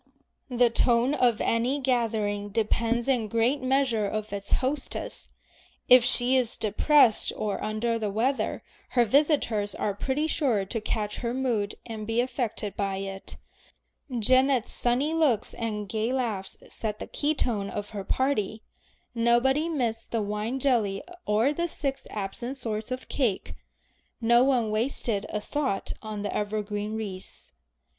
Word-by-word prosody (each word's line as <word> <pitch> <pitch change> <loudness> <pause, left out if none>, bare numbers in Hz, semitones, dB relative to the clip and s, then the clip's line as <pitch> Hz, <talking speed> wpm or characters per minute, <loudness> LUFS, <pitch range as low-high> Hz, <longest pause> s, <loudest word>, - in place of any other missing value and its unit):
The 245 -1 +3
tone 240 +3 +3
of 245 -6 +3
any 240 +5 +1
gathering 220 -6 0
depends 230 +3 0
in 245 -5 +1
great 230 +6 +1
measure 255 -5 +1
on 215 0 -2
its 200 -1 -3
hostess. 270 +2 -2 0.6
If 250 -1 +9
she 245 +1 +4
is 250 -3 +1
depressed 225 +3 +4
or 210 -2 -2
under 230 +2 -1
the 215 -2 -1
weather, 240 +7 0 0.3
her 240 - +6
visitors 230 - +2
are 205 - -1
pretty 270 +9 -1
sure 250 -11 +1
to 225 +3 -3
catch 210 -1 -2
her 240 0 -2
mood 235 -6 0
and 220 -2 -6
be 225 +1 0
affected 240 -5 -2
by 195 -1 -1
it. 195 0 -6 0.8
Janet's 255 +2 +3
sunny 255 +6 +1
looks 290 -10 +2
and 210 -3 -3
gay 220 +4 -1
laughs 225 -7 -2
set 215 -2 -4
the - - -6
key 300 +1 -1
note 205 -5 -1
of 205 0 -5
her 205 -2 -5
party. 220 -3 0 0.5
Nobody 245 +7 +3
missed 235 -7 -2
the 225 -2 -1
wine 210 +5 -2
jelly 230 -7 +1 0.2
or 220 +7 +3
the 340 +3 -1
six 275 -4 -3
absent 220 +6 -5
sorts 220 -3 -4
of 255 0 -5
cake, 235 -9 -1 0.7
no 235 +1 +5
one 250 -5 +2
wasted 220 -2 0
a 210 - -2
thought 265 -2 -2
on 215 -2 -5
the 205 - -3
evergreen 210 0 -2
wreaths. 200 -4 -6
230 Hz, 145 wpm, -27 LUFS, 210-260 Hz, 0.8 s, If